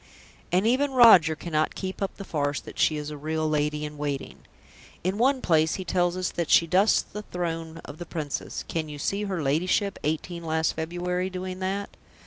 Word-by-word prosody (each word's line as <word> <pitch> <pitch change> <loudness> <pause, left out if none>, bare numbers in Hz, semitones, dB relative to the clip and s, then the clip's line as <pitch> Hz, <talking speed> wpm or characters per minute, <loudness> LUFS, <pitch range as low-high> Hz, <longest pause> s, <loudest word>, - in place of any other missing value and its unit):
And 185 +4 +3
even 265 +4 +2
Roger 190 -11 +7
cannot 155 -1 -1
keep 190 0 -5
up 195 - -2
the 200 - -6
farce 145 -4 -1
that - - -11
she 155 - +3
is 150 0 -5
a 150 - -6
real 155 +2 -1
lady 150 0 0
in 150 0 -8
waiting. 145 -2 -4 0.6
In 190 +4 -1
one 260 +2 +3
place 160 -2 +3
he 185 - -5
tells 175 -1 +1
us 185 -1 -1
that 170 -2 -3
she 170 - +6
dusts 190 +6 +3
the 210 - -8
throne 165 -4 -4
of 145 - -10
the 175 - -7
Princess; 155 -5 -4
can 160 -2 -3
you 150 - -7
see 200 +8 -1
her 185 -5 -2
ladyship, 180 +7 +1
eighteen 170 +3 -2
last 160 0 +1
February, 180 +3 -2
doing 185 0 -5
that? 195 +2 -3
170 Hz, 195 wpm, -26 LUFS, 155-185 Hz, 0.6 s, Roger